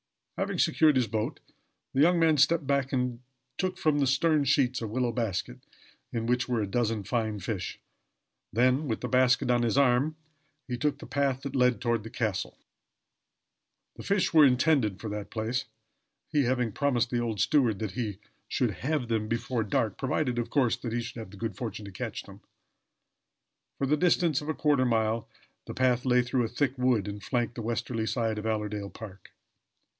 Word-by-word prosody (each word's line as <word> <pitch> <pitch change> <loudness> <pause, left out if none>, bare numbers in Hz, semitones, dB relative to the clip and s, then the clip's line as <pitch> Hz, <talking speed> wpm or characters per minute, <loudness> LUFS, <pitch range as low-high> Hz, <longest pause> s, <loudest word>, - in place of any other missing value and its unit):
Having - - -2
secured 150 +2 +4
his 125 -2 +3
boat, 110 0 -3 0.5
the 135 - +2
young 175 +3 +5
man 160 -1 +4
stepped 150 +2 +3
back 140 -1 0
and 125 -2 -1 0.4
took 185 -1 -1
from 150 -2 +2
the 140 - +2
stern 150 +3 +3
sheets 130 -2 +2
a 115 - -3
willow 120 +2 0
basket, 100 - -3 0.5
in 115 -1 -2
which 125 +2 0
were 120 -3 +1
a - - 0
dozen 110 0 -1
fine 110 0 -1
fish; 100 0 -4 0.7
and - - -11
then, 130 +5 +3
with 110 - -2
the 125 - -2
basket 125 0 +3
on 120 -1 +3
his 120 +2 +1
arm, 140 +3 +3 0.5
he 125 - -2
took 145 +4 0
the - - -10
path 135 -2 -1
that 140 -1 -5
led 125 -2 +3
toward 120 -2 0
the 115 - -9
castle. 110 -4 -2 1.4
The - - -7
fish 195 -3 +1
were 155 -2 +8
intended 130 - +3
for 110 - -5
that 105 -1 -5
place, 115 +3 -2 0.6
he 145 -4 +2
having 125 -2 0
promised 125 -2 0
the 120 - +1
old 115 -3 -2
steward 120 0 +3
that 105 -1 -3
he 105 -2 -3 0.3
should - - 0
have 145 -2 -1
them 110 -2 -1
before 115 +1 -1
dark, 105 0 -1
provided, 130 -2 0
of 120 - -3
course, 130 -6 +2
that 120 -2 -5
he 120 - 0
should 115 0 -7
have 110 - -7
the 100 - -13
good 110 -2 -4
fortune 110 -1 -5
to 100 - -8
catch 90 - -5
them. - - -14 1.4
For 140 - 0
the 145 +3 +3
distance 170 -3 +2
of 150 - -7
a 155 - -1
quarter 145 -4 +2
of 130 - +3
a - - 0
mile 110 0 0 0.4
the - - -6
path 125 -1 +2
lay 125 -1 +4
through 120 +1 0
a - - -1
thick 135 +2 -1
wood 125 -6 +2
and 105 0 -6
flanked 120 0 -1
the 120 - -6
westerly 115 0 -2
side 115 -3 -1
of 110 - -4
Allerdale 105 -2 -2
park. 100 -4 -11
120 Hz, 200 wpm, -28 LUFS, 110-135 Hz, 1.4 s, were